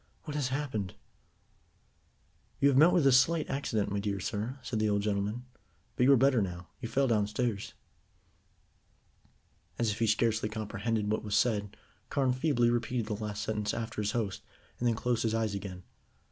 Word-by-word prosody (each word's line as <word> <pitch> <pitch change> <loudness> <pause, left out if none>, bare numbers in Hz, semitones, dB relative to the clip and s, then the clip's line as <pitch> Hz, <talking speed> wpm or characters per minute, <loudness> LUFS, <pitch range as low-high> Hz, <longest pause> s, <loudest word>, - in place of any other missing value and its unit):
"What 150 - -6
has 145 -3 0
happened?" 130 -9 -3 1.6
"You 140 - +5
have 135 - +3
met 160 +4 +7
with 175 -5 +3
a 135 - +6
slight 155 +5 +4
accident, 115 -8 -1
my 100 - 0
dear 100 -1 -2
sir," 110 +7 -3
said 110 - -2
the 110 0 +2
old 100 -1 +1
gentleman, 105 +4 -1 0.5
"but 125 - +3
you 140 - +6
are 135 - +7
better 130 -2 +4
now. 90 -3 -5
You 115 - -4
fell 135 +2 +2
downstairs." 105 -1 -1 2.0
As 115 -2 +1
if 105 - -5
he 115 - +2
scarcely 110 0 +1
comprehended 110 0 -2
what 110 - 0
was 105 -1 -1
said, 105 -3 +1 0.3
Carne 135 -3 +1
feebly 130 -3 +2
repeated 120 0 -1
the 105 -1 -3
last 105 -1 -3
sentence 105 -1 -2
after 115 -2 -3
his 105 0 -1
host, 105 -5 -2 0.4
and 120 - +1
then 115 - +2
closed 120 0 0
his 115 -1 0
eyes 110 -2 0
again. 95 -2 -6
110 Hz, 175 wpm, -30 LUFS, 105-125 Hz, 2.0 s, met